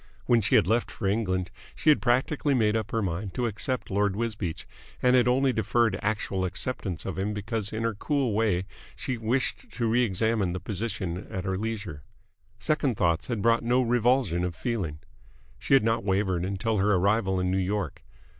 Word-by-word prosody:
When 120 -2 +4
she 100 - +2
had - - +5
left 115 +5 +1
for 105 - -6
England, 95 -3 0 0.2
she 155 - +1
had 150 - +3
practically 135 +3 +1
made 110 -3 +2
up 110 -2 -1
her 115 -1 -1
mind 95 +1 -3
to 125 - 0
accept 120 +3 -2
Lord 100 0 +1
Wisbeach, 105 -7 -3 0.3
and 125 0 +4
had 125 -1 +4
only 130 +1 +3
deferred 110 -1 +2
actual 105 -3 -1
acceptance 95 -2 -3
of 95 -1 -4
him 105 +2 -1
because 105 0 -3
in 110 +1 -3
her 115 -1 0
cool 135 +2 0
way 100 -4 +1 0.3
she 125 -3 -4
wished 130 - -1
to 120 -2 -1
re 115 +3 +3
examine 110 -3 +1
the 95 - -3
position 95 -4 -4
at 95 -4 -4
her 95 -1 -1
leisure. 105 -7 -4 0.6
Second 145 -7 0
thoughts 85 0 +1
had 115 -5 -2
brought 115 0 +4
no 125 +2 +3
revulsion 120 -6 +2
of 90 -2 -2
feeling. 95 -9 -3 0.6
She 135 - +3
had 135 - +5
not 115 +1 +1
wavered 95 -3 0
until 100 +3 -1
her 100 +1 +3
arrival 95 0 +2
in 90 0 0
New 95 - +1
York. 100 +2 -2
105 Hz, 190 wpm, -27 LUFS, 95-120 Hz, 0.6 s, had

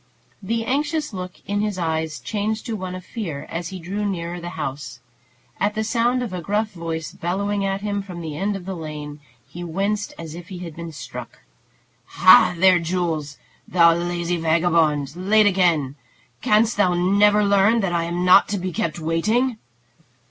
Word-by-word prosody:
The 225 +3 -2
anxious 295 +2 -1
look 180 -1 -5
in 205 0 -1
his 210 -2 -2
eyes 160 -4 -2
changed 210 - -3
to 230 -3 -3
one 185 -2 -5
of 185 -1 -9
fear 170 - -5
as 170 0 -3
he 190 - -7
drew 195 +5 -4
nearer 175 -3 -3
the 175 - -5
house. 140 -3 -5 0.6
At 205 +1 0
the 220 - 0
sound 240 +3 +1
of 220 -6 -5
a 180 - -4
gruff 210 +4 -1
voice 165 -3 -5
bellowing 200 +3 -2
at 195 0 -1
him 205 -1 -2
from 185 -3 -8
the 160 -3 -5
end 200 +5 -1
of 190 -2 -7
the 190 - -4
lane, 150 -3 -7 0.3
he 175 - -8
winced 200 +5 -2
as 165 -2 -8
if 170 +1 -9
he 185 -2 -8
had 170 -3 -8
been 170 0 -7
struck. 140 -5 -9 0.8
"Ha, - - +7
there, 185 0 +5
Jules! 165 -4 -2 0.3
Thou 170 -2 +5
lazy 175 0 -2
vagabond! 160 -3 +2
Late 205 +4 +3
again! 170 -8 +2 0.4
Canst 220 +2 +3
thou 185 -4 +3
never 205 +4 +4
learn 200 +3 +4
that 190 -3 -1
I 170 -1 +1
am 175 +1 -2
not 185 +2 +7
to 205 - -1
be 185 -1 -4
kept 160 0 -2
waiting?" 215 +10 0
180 Hz, 180 wpm, -22 LUFS, 165-205 Hz, 0.8 s, Ha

